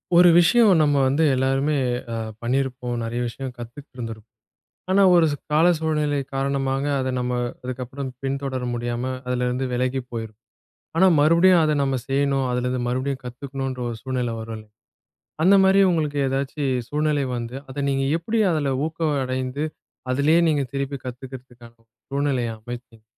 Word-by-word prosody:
ஒரு 175 0 +8
விஷயம் 220 +6 +5
நம்ம 145 -2 +3
வந்து 140 +5 +2
எல்லாருமே 135 +3 +1 0.4
ஆ - - -2 0.2
பண்ணி 125 +3 0
இருப்போம். 125 -2 -5
நெறைய 115 +1 -3
விஷயம் 130 +3 -6
கத்துக்கிட்டு 120 +4 -11
இருந்திருப்போம். 115 -2 -7 0.6
ஆனா 195 +1 +5
ஒரு 170 -2 +5 0.2
கால 155 +3 +4
சூழ்நிலை 150 -2 0 0.2
காரணமாக 135 0 -1 0.2
அதை 130 0 -1
நம்ம 125 0 -1 0.3
அதுக்கப்புறம் 130 +2 -5
பின்தொடர 135 -1 -2
முடியாம 120 0 -3 0.2
அதுல 125 0 0
இருந்து 125 +2 -1
விலகிப் 125 +1 -1
போயிருப்போம். 110 -2 -6 0.6
ஆனா, 190 +3 +6
மறுபடியும் 170 +4 +5
அதை 155 -1 +2
நாம 135 -1 0
செய்யணும். 135 0 +1
அதுல 125 0 -1
இருந்து 125 0 -1
மறுபடியும் 130 +2 -2
கத்துக்கணும் 135 +2 -5
என்ற 130 -1 -6
ஒரு 115 - -4
சூழ்நிலை 125 -3 -2
வரும். 110 -1 -7 0.8
அந்த 190 +4 +6
மாதிரி 190 +1 +5
உங்களுக்கு 150 -4 0
ஏதாச்சு 135 +2 -2 0.2
சூழ்நிலை 150 0 0
வந்து 120 +1 -5
அதை 135 +2 -5
நீங்க 135 0 0
எப்படி 220 +7 -1
அதுல 145 -4 0
ஊக்கமடைந்து 140 -4 -2 0.5
அதுலயே 150 +5 +3
நீங்கத் 140 -5 0
திருப்பிக் 140 -1 -3
கத்துக்கிறதுக்கான 125 -1 -10
ஒரு 115 - -40 0.2
சூழ்நிலையை 135 -4 0
அமைச்சிங்க? 120 0 -10
135 Hz, 150 wpm, -23 LUFS, 125-145 Hz, 0.8 s, ஒரு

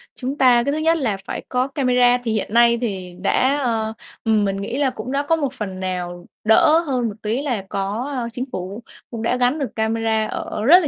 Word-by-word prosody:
chúng 265 +2 -4
ta 245 -3 +5
cái 280 - 0
thứ 295 - -1
nhất 325 +1 +2
là 230 -10 -1
phải - - -4
có 255 +1 +1
camera. 250 -3 +3
Thì 230 - -1
hiện 215 -1 -2
nay 235 0 +5
thì 190 -6 -4
đã, 260 +8 +2
ờ, 220 -3 0 0.3
ừm, 220 -2 +2
mình 195 0 -1
nghĩ 230 +6 -3
là 280 -2 +2
cũng 255 0 -6
đã 280 +1 0
có 330 - +5
một 280 -5 -2
phần 190 -6 -5
nào 175 -1 -4 0.2
đỡ 310 +9 +5
hơn 260 -8 -1
một 215 - -4
tí 220 +5 -1
là 245 -9 -2
có, 205 +7 -2
ơ, 240 -2 -2
chính 250 +2 -3
phủ 190 +5 -5 0.3
cũng 230 -2 -5
đã 235 +2 +1
gắn 250 +5 +2
được 275 - -4
camera 220 0 0
ở 210 - -4
rất 340 +8 +8
là 315 - -1
240 Hz, 230 wpm, -21 LUFS, 215-265 Hz, 0.3 s, rất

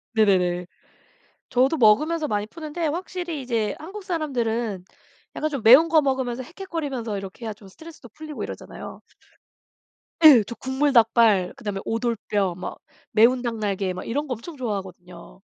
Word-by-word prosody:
네네네. 180 -4 +2 0.8
저도 265 +5 +2
먹으면서 300 +8 +3
많이 210 -2 -1
푸는데 320 +4 -4
확실히 345 -1 -4
이제 230 -4 -1
한국 385 +6 -9
사람들은 240 - -2 0.5
약간 310 - -1
좀 280 -6 -4
매운 265 +9 +8
거 315 -1 +5
먹으면서 260 -3 -1
헥헥거리면서 285 - -5
이렇게 195 +4 -8
해야 220 - -3
좀 205 -1 -16
스트레스도 305 - -13
풀리고 305 +5 -8
이러잖아요. - - -8 1.2
예. 255 -8 +9
저 235 - -7
국물 265 +4 0
닭발 225 -6 +4
그다음에 210 -7 -5
오돌뼈 225 -4 -1
막 180 - -7 0.3
매운 235 +4 +4
닭 235 -2 -3
날개 195 -3 -2
막 185 - -7
이런 290 +5 -2
거 255 - -2
엄청 285 +7 -9
좋아하거든요. 190 - -7
240 Hz, 350 characters per minute, -24 LUFS, 210-300 Hz, 1.2 s, 예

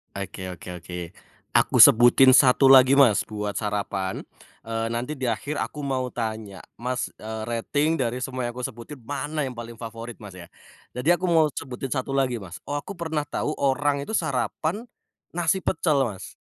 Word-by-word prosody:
Oke 95 -1 -6
oke 90 - -11 0.2
oke, 90 - -7 0.6
aku - - +3
sebutin 120 +3 +8
satu 135 0 +6
lagi, 135 +1 +7
Mas, 120 -7 +5
buat 105 -1 -5
sarapan, 100 -3 -2 0.4
eee, 115 0 -3
nanti 125 +6 -3
di 130 - -9
akhir 125 +6 -2
aku 150 - -4
mau 130 -3 -2
tanya, 110 -4 -5 0.2
Mas, 125 +1 -3
eee, 110 0 -6
rating 145 +7 0
dari 125 -2 -2
semua 130 0 -4
yang 120 - -2
aku 125 - -10
sebutin 125 +2 -7
mana 145 +4 -3
yang 125 - -7
paling 115 -1 -9
favorit, 115 0 -8
Mas, 100 -4 -11
ya. 85 -2 -12 0.4
Jadi 145 +8 +2
aku 175 0 -2
mau 160 -2 +5
sebutin 130 0 -5
satu 130 +1 -3
lagi, 135 -3 +1
Mas, 90 -2 -9
oh 145 - -3
aku 145 +7 -5
pernah 160 -5 -3
tahu 150 +1 -3
orang 140 +1 0
itu 145 - -7
sarapan, 175 +1 -1 0.5
nasi 175 +2 0
pecel, 150 -4 +1
Mas. 105 -7 -6
125 Hz, 175 wpm, -24 LUFS, 115-145 Hz, 0.6 s, sebutin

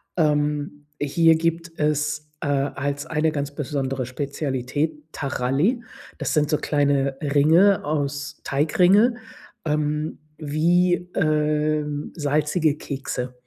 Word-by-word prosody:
Ähm, 150 -2 0
hier 160 +3 +4
gibt 165 +1 -1
es, 150 0 0
äh 150 - -2
als 140 0 -1
eine 160 0 0
ganz 145 -2 -3
besondere 135 -3 -2
Spezialität, 145 +3 -3
Taralli. 145 - 0 0.4
Das - - -2
sind 150 -3 +2
so 150 - +2
kleine 140 -2 +1
Ringe 160 +7 +4
aus 145 -1 -3
Teigringe 180 - +3 0.5
ähm, 150 0 -1 0.2
wie, 170 +4 +2 0.2
ähm, 150 -1 0
salzige 150 +1 +1
Kekse. 135 -3 -4
150 Hz, 105 wpm, -23 LUFS, 145-155 Hz, 0.5 s, hier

